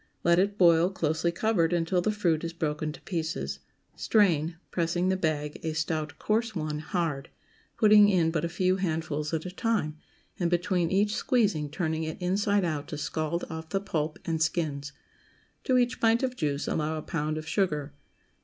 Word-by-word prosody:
Let 170 0 +4
it 200 +2 +1
boil, 170 -1 +5
closely 165 -2 0
covered, 175 -3 +1
until 175 +1 +1
the 215 - +1
fruit 175 -7 0
is 165 0 -4
broken 155 -2 -2
to 150 - -12
pieces; 70 - -3 0.4
strain, 170 -6 +2 0.2
pressing 175 +1 0
the 190 - +2
bag 150 -4 -2
(a 160 - -2
stout 155 -1 -2
coarse 220 +1 0
one) 155 -2 -2
hard, 155 -4 -2 0.5
putting 210 -2 +7
in 170 -5 +3
but 165 - -1
a 170 - -1
few 185 +2 +1
handfuls 160 -4 -2
at 160 0 -2
a 180 - -5
time, 190 -8 -1 0.4
and 175 -2 +1
between 175 0 +1
each 205 +2 +2
squeezing 200 - +1
turning 160 +1 -2
it 160 +2 -4
inside 200 +2 +1
out 155 -3 -2
to 150 - -5
scald 155 +3 -2
off 160 -1 -7
the 195 - 0
pulp 155 -5 -2
and 160 -1 -1
skins. 150 -4 -1 0.7
To 255 - +3
each 245 0 +1
pint 230 +2 +3
of 255 -1 -1
juice 145 -8 -2
allow 155 0 -1
a 155 - -5
pound 155 -2 -2
of 155 0 -6
sugar. 150 -8 -1
165 Hz, 180 wpm, -28 LUFS, 155-190 Hz, 0.7 s, putting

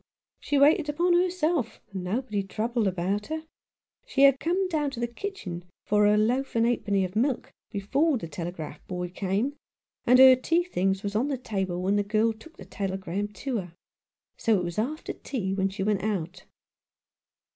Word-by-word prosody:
She 290 - 0
waited 295 +2 +5
upon 345 +4 +2
herself, 345 -7 +1
and 190 -2 -5
nobody 210 +2 -1
troubled 220 +3 -1
about 190 +3 -1
her. 315 0 -4 0.6
She 280 - +2
had 275 -1 +6
come 370 +3 0
down 305 -5 0
to 270 -4 -8
the 240 - +1
kitchen 235 - -6 0.2
for 210 0 +4
her 210 0 +4
loaf 245 +6 +1
and 230 0 +3
ha'porth 210 -5 +1
of 185 +2 -8
milk 250 +3 0 0.2
before 270 +10 +1
the 170 - -6
telegraph 165 0 -6
boy 180 -1 -4
came, 200 +9 -1 0.5
and 250 +1 +6
her 260 0 +9
tea 330 +7 +1
things 195 - -1
was 205 0 -3
on 240 +6 +2
the 280 -2 -1
table 190 -7 -3
when 200 +2 +2
the 205 - +2
girl 215 +2 +2
took 270 +9 -16
the 190 - -10
telegram 195 0 -3
to 230 +5 -4
her. 175 -3 -8 0.6
So 225 -2 +2
it 180 - -1
Was 175 +2 -3
after 295 +8 -3
tea 195 -8 -3
when 195 0 +1
she 190 0 -4
went 205 -1 +1
out." 190 -3 -3
215 Hz, 180 wpm, -27 LUFS, 190-275 Hz, 0.6 s, her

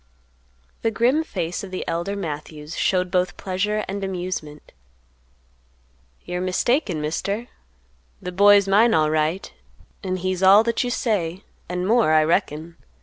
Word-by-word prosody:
The 225 - +1
grim 245 +8 +2
face 180 - -4
of 195 - -7
the 185 - -5
elder 170 +4 -2
Matthews 150 -3 -6
showed 180 -1 0
both 180 -1 0
pleasure 210 +3 -2
and 195 +1 -4
amusement. 180 -5 -5 1.5
"You're 180 0 -3
mistaken, 185 - 0
Mister; 200 +9 -3 0.7
the 180 - -6
boy's 200 +1 +5
mine 220 +4 +4
alright, 155 - 0 0.5
an' 185 -1 -2
he's 185 0 -2
all 195 +3 +7
that 235 +1 0
you 245 - -2
say, 195 -7 -1 0.3
an' 180 0 -2
more, 225 -6 +3
I 155 0 +5
reckon. 160 +1 -1
185 Hz, 135 wpm, -22 LUFS, 165-205 Hz, 1.5 s, all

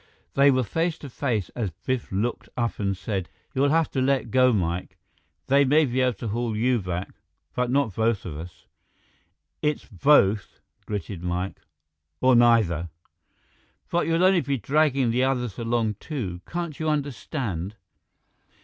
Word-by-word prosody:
They 140 +1 +5
were 130 -1 +3
face 165 - -1
to 140 -5 -10
face 115 - -1
as 115 -5 -3
Biff 115 +9 -4
looked 105 +5 -2
up 115 -1 -1
and 100 -2 -1
said, 95 -2 -3 0.2
"You'll 140 +1 +2
have 160 +1 +2
to 130 - 0
let 130 -3 +1
go, 130 0 +5
Mike. 90 -4 -2 0.5
They 140 +1 +4
may 150 +3 +4
be 130 -1 -1
able 125 -1 +2
to 110 +2 -5
haul 115 0 -2
you 125 +2 +2
back, 90 0 -4 0.4
but 125 -1 0
not 130 -5 +1
both 110 -1 0
of 80 -5 -5
us." 85 +4 -10 1.0
"It's 150 -1 -1
both," 105 - +3 0.3
gritted 100 -3 -4
Mike, 90 +2 -3 0.6
"or 130 -1 +5
neither!" 110 -9 +4 1.0
"But 175 - +1
you'll 165 +2 +2
only 185 -2 +5
be 140 0 -1
dragging 135 +1 +2
the 125 +2 +2
others 125 -6 -1
along, 115 -3 0
too. 100 - -5
Can't 170 -4 -4
you 160 -1 0
understand?" 125 - -3
120 Hz, 155 wpm, -25 LUFS, 100-140 Hz, 1.0 s, They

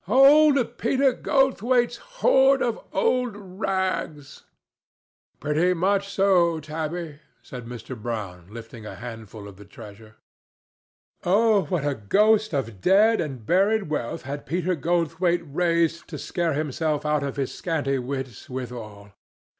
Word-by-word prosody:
"Old 275 +1 +5
Peter 265 +2 +2
Goldthwaite's 250 -3 +1
hoard 275 - +3
of 235 -2 -2
old 245 +3 0
rags!" 185 -7 -4 0.9
"Pretty 160 +5 +1
much 195 +3 +1
so, 185 -4 +3
Tabby," 155 0 -5 0.2
said 125 -2 -9
Mr. 120 +1 -8
Brown, 105 -6 -6
lifting 115 0 -10
a 105 - -8
handful 110 -3 -9
of 100 -2 -12
the 105 - -12
treasure. 110 +1 -13 1.1
Oh 205 0 +3
what 150 -1 -2
a 145 - +1
ghost 210 - +2
of 115 - -3
dead 215 +3 +4
and 135 -8 -6
buried 195 - +2
wealth 120 -6 -3
had 140 +2 -6
Peter 180 +4 0
Goldthwaite 170 +2 0
raised 165 +2 0
to 155 - -7
scare 170 +1 -2
himself 150 +1 -2
out 150 -1 +1
of 140 -1 -4
his 135 -2 -3
scanty 145 -6 -1
wits 130 -2 -6
withal! 115 -5 -7
165 Hz, 130 wpm, -24 LUFS, 130-200 Hz, 1.1 s, Old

